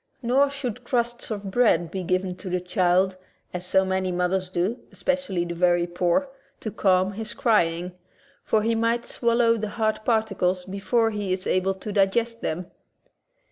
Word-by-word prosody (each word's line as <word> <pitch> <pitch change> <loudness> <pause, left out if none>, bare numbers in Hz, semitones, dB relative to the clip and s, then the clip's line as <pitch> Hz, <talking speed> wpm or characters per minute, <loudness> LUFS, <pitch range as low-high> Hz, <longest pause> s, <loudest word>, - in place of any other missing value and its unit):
Nor 265 +4 +3
should 250 -4 -5
crusts 240 -1 -1
of 200 -3 -4
bread 175 -8 +3
be 190 - -3
given 185 0 -1
the 180 -1 -3
child 180 +1 +2 0.2
— - - -41
as 180 0 -3
so 190 +1 +3
many 190 0 0
mothers 180 +1 0
do, 185 +7 -1
especially 270 -11 -1
the 170 - -4
very 175 0 +3
poor 175 +9 +1 0.2
— - - -37
to 220 - -4
calm 185 -1 +2
his 220 +2 -6
crying, 180 -9 +1 0.5
for 215 -1 +1
he 230 +1 +2
^ - - 0
might 230 +1 +1
swallow 235 -1 +2
the 215 -1 -3
hard 215 0 -1
particles 195 -6 +1
before 225 +4 +1
he 205 -3 -3
is 185 0 -1
able 190 +1 +1
to 200 +3 -6
digest 225 +4 +1
them. 175 +3 -3
195 Hz, 175 wpm, -25 LUFS, 180-230 Hz, 0.5 s, Nor